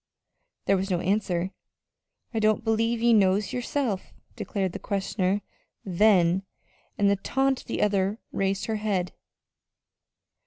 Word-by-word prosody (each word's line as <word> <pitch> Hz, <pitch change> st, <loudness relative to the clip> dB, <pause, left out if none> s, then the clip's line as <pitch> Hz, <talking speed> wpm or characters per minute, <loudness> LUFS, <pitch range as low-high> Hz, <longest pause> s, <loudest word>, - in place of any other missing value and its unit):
There 195 Hz, -, +3 dB
was 190 Hz, +1 st, -2 dB
no 180 Hz, -2 st, +1 dB
answer. 185 Hz, -1 st, 0 dB, 0.8 s
"I 225 Hz, -, 0 dB
don't 215 Hz, +1 st, +2 dB
believe 225 Hz, +1 st, +1 dB
ye 235 Hz, 0 st, +5 dB
knows 195 Hz, -1 st, +3 dB
yerself," 245 Hz, -5 st, -2 dB, 0.2 s
declared 195 Hz, -4 st, -2 dB
the -, -, -6 dB
questioner 195 Hz, 0 st, -1 dB, 0.4 s
then; 185 Hz, -2 st, +4 dB, 0.6 s
and 205 Hz, -, +3 dB
at 200 Hz, -, +2 dB
the -, -, -33 dB
taunt 270 Hz, +3 st, 0 dB
the -, -, -1 dB
other 200 Hz, 0 st, +1 dB
raised 195 Hz, 0 st, -1 dB
her 220 Hz, -1 st, -1 dB
head. 195 Hz, -4 st, -1 dB
200 Hz, 130 wpm, -26 LUFS, 190-220 Hz, 0.8 s, ye